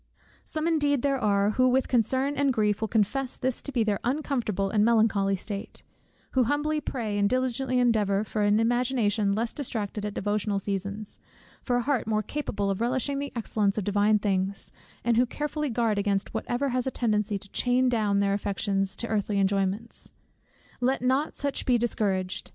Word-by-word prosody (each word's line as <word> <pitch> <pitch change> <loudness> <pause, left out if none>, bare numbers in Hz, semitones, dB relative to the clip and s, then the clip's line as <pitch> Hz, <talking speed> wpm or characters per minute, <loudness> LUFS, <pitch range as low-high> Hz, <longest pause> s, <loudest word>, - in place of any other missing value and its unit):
Some 310 +1 -3
indeed 290 -5 +2
there 275 -1 +1
are 205 -2 +2
who 255 +3 +3
with 260 +1 +2
concern 260 +4 +1
and 280 -1 +2
grief 210 -3 +1
will 220 - 0
confess 240 +5 0
this 260 -1 -1
to 280 - -6
be 245 -4 +1
their 210 -2 0
uncomfortable 240 -8 -1
and 210 -1 +3
melancholy 215 -3 +3
state; 200 +1 -7 0.5
who 255 -2 +3
humbly 300 +4 0
pray, 220 -7 -3
and 200 0 +3
diligently 255 +1 0
endeavour, 215 -5 +2
for 215 0 -3
an 205 +1 +3
imagination 230 -3 +1
less 225 +2 -1
distracted 215 -7 -4
at 210 -1 -4
devotional 205 0 -1
seasons, 200 +1 -4 0.4
for 245 - 0
a 245 - +1
heart 265 -5 0
more 215 -1 +1
capable 205 -6 -2
of 195 - -3
relishing 260 +3 0
the 285 0 -4
excellence 210 -3 0
of 210 - 0
divine 205 +2 +3
things; 195 -1 -1 0.3
and 235 -1 +2
who 245 +1 +4
carefully 295 +2 -3
guard 225 -3 +1
against 200 -1 -1
whatever 265 +3 -1
has 255 +1 0
a - - +3
tendency 215 -4 0
to 200 +1 -10
chain 250 +4 +2
down 210 -5 +2
their 200 0 +2
affections 200 -1 -1
to 235 - -3
earthly 210 -2 -1
enjoyments. 195 +3 0 0.7
Let 255 +1 0
not 265 +4 +1
such 280 -1 -2
be 250 -2 +3
discouraged. 190 -6 -1
220 Hz, 180 wpm, -27 LUFS, 205-255 Hz, 0.7 s, who